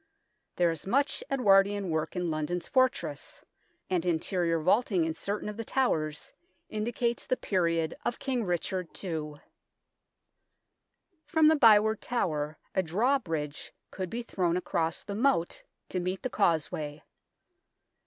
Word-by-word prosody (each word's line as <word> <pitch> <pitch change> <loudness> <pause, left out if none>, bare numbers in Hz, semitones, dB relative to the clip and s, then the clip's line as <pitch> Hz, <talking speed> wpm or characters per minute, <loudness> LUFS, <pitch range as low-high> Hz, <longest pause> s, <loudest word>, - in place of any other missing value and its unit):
There 175 -1 +3
is 165 +2 -6
much 275 +8 +1
Edwardian 200 -6 +3
work 160 +3 -2
in 180 -2 -1
London's 155 +3 -2
fortress, 205 - 0 0.5
and 180 -3 0
interior 170 0 0
vaulting 185 +1 +2
in 160 - -1
certain 200 +6 -3
of 210 0 -5
the 230 - -3
towers 155 - -1 0.4
indicates 235 +2 -2
the 255 - +1
period 165 -4 0
of 240 - -1
King 255 -4 -1
Richard 180 0 -2 0.2
II. 155 -5 -3 1.9
From 310 0 +4
the 315 - +5
Byward 220 -5 +5
Tower 155 -10 -2 0.2
a 190 - +2
drawbridge 170 - -1 0.2
could 185 -2 -4
be 235 +4 -4
thrown 180 -6 0
across 165 -2 -1
the 200 - -6
moat 220 -6 +1 0.3
to 185 - -2
meet 185 +2 -3
the 255 - -2
causeway. 155 -5 0
185 Hz, 130 wpm, -29 LUFS, 165-230 Hz, 1.9 s, the